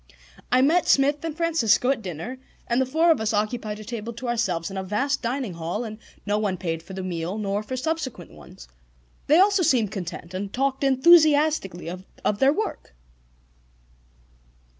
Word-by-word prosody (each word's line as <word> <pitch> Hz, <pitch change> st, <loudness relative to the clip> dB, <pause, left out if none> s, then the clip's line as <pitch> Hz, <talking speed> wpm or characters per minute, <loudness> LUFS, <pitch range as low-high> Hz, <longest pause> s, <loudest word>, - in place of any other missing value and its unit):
I 255 Hz, +1 st, +4 dB
met 335 Hz, +6 st, +3 dB
Smith 285 Hz, +2 st, +3 dB
and 320 Hz, -2 st, -4 dB
Francisco 295 Hz, -7 st, +2 dB
at 255 Hz, -4 st, -2 dB
dinner 190 Hz, -, -6 dB, 0.3 s
and 240 Hz, +2 st, +1 dB
the 260 Hz, -, 0 dB
four 325 Hz, +5 st, +3 dB
of 315 Hz, -, +2 dB
us 220 Hz, 0 st, 0 dB
occupied 215 Hz, 0 st, -2 dB
a -, -, -8 dB
table 230 Hz, +1 st, -6 dB
to 245 Hz, +2 st, -7 dB
ourselves 195 Hz, -8 st, -1 dB
in 195 Hz, -, -6 dB
a 190 Hz, -, -2 dB
vast 255 Hz, +9 st, -1 dB
dining 245 Hz, -4 st, -2 dB
hall, 170 Hz, +7 st, -4 dB
and 215 Hz, -1 st, -7 dB, 0.3 s
no 210 Hz, 0 st, 0 dB
one 200 Hz, -3 st, -1 dB
paid 165 Hz, -2 st, -3 dB
for 180 Hz, +3 st, -11 dB
the 190 Hz, 0 st, -5 dB
meal 175 Hz, +1 st, -3 dB
nor 205 Hz, -1 st, -1 dB
for 255 Hz, +5 st, -5 dB
subsequent 260 Hz, -, -4 dB
ones. -, -, -14 dB, 0.6 s
They 305 Hz, -, +5 dB
also 400 Hz, 0 st, +4 dB
seemed 245 Hz, -, +2 dB
content, 175 Hz, -2 st, -6 dB
and 195 Hz, +1 st, -4 dB
talked 270 Hz, +2 st, -1 dB
enthusiastically 295 Hz, -, +4 dB
of 185 Hz, +3 st, -4 dB
their 270 Hz, +1 st, +5 dB
work. 365 Hz, -, -4 dB
230 Hz, 175 wpm, -24 LUFS, 195-275 Hz, 0.6 s, They